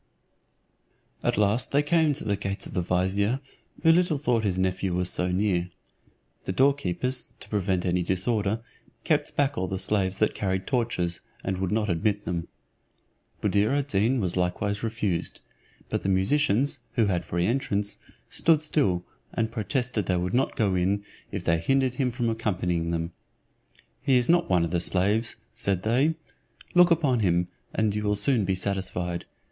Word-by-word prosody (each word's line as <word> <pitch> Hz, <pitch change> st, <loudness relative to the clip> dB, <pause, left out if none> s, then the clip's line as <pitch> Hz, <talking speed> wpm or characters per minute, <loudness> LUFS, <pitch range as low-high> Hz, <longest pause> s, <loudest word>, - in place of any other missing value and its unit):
At -, -, 0 dB
last 105 Hz, +3 st, +2 dB
they 145 Hz, +1 st, +3 dB
came 160 Hz, -1 st, +3 dB
to 140 Hz, -, -1 dB
the 100 Hz, -, 0 dB
gates 100 Hz, 0 st, -4 dB
of -, -, -8 dB
the 90 Hz, -, 0 dB
vizier 95 Hz, +7 st, +1 dB, 0.4 s
who 165 Hz, -, +7 dB
little 175 Hz, -2 st, +3 dB
thought 125 Hz, -5 st, +1 dB
his 95 Hz, -3 st, 0 dB
nephew 95 Hz, 0 st, 0 dB
was 90 Hz, 0 st, +1 dB
so 90 Hz, 0 st, 0 dB
near. 90 Hz, -2 st, +1 dB, 0.8 s
The -, -, -1 dB
doorkeepers, 130 Hz, 0 st, +1 dB
to -, -, -11 dB
prevent 95 Hz, -3 st, 0 dB
any 90 Hz, 0 st, +1 dB
disorder, 100 Hz, +4 st, 0 dB, 0.4 s
kept -, -, 0 dB
back 145 Hz, 0 st, +1 dB
all 95 Hz, -, -1 dB
the 95 Hz, -, -3 dB
slaves 95 Hz, -1 st, 0 dB
that 110 Hz, -, +2 dB
carried 95 Hz, -1 st, -2 dB
torches, 115 Hz, -9 st, -1 dB, 0.2 s
and 95 Hz, -1 st, -2 dB
would 95 Hz, 0 st, -1 dB
not 105 Hz, 0 st, +1 dB
admit 100 Hz, +4 st, 0 dB
them. 85 Hz, -1 st, -3 dB, 1.0 s
Buddir 105 Hz, +7 st, +2 dB
ad 145 Hz, 0 st, -2 dB
Deen 115 Hz, +5 st, +2 dB
was 90 Hz, -5 st, -1 dB
likewise 95 Hz, +3 st, -1 dB
refused; 110 Hz, -6 st, -2 dB, 0.5 s
but -, -, -2 dB
the 95 Hz, -, -1 dB
musicians, 125 Hz, +7 st, +2 dB
who 115 Hz, -4 st, +3 dB
had 90 Hz, -3 st, 0 dB
free 85 Hz, 0 st, -1 dB
entrance, 105 Hz, -3 st, -1 dB, 0.3 s
stood 160 Hz, -2 st, +2 dB
still, 95 Hz, -, +1 dB, 0.3 s
and 115 Hz, 0 st, -1 dB
protested 115 Hz, -2 st, -1 dB
they 90 Hz, -, +2 dB
would 90 Hz, +1 st, -2 dB
not 130 Hz, -, +1 dB
go 100 Hz, -4 st, +1 dB
in, 95 Hz, +3 st, +1 dB, 0.3 s
if -, -, -4 dB
they 85 Hz, 0 st, +2 dB
hindered 130 Hz, +7 st, +2 dB
him 130 Hz, -3 st, +1 dB
from 120 Hz, 0 st, -2 dB
accompanying 90 Hz, -7 st, -1 dB
them. 85 Hz, 0 st, -2 dB, 0.9 s
"He 135 Hz, -3 st, +3 dB
is 125 Hz, -1 st, +2 dB
not 175 Hz, +1 st, +3 dB
one 90 Hz, -2 st, +3 dB
of 85 Hz, -, -5 dB
the 90 Hz, -, +1 dB
slaves'" 100 Hz, +6 st, +1 dB, 0.2 s
said 95 Hz, -2 st, -1 dB
they; 135 Hz, +9 st, +2 dB, 0.6 s
"look 180 Hz, 0 st, +7 dB
upon 150 Hz, -7 st, +2 dB
him, 90 Hz, -3 st, +1 dB, 0.2 s
and 110 Hz, -2 st, +1 dB
you 105 Hz, -, -1 dB
will 105 Hz, 0 st, +1 dB
soon 105 Hz, +1 st, +2 dB
be 95 Hz, 0 st, +1 dB
satisfied. 90 Hz, -2 st, -2 dB
100 Hz, 170 wpm, -26 LUFS, 90-125 Hz, 1.0 s, who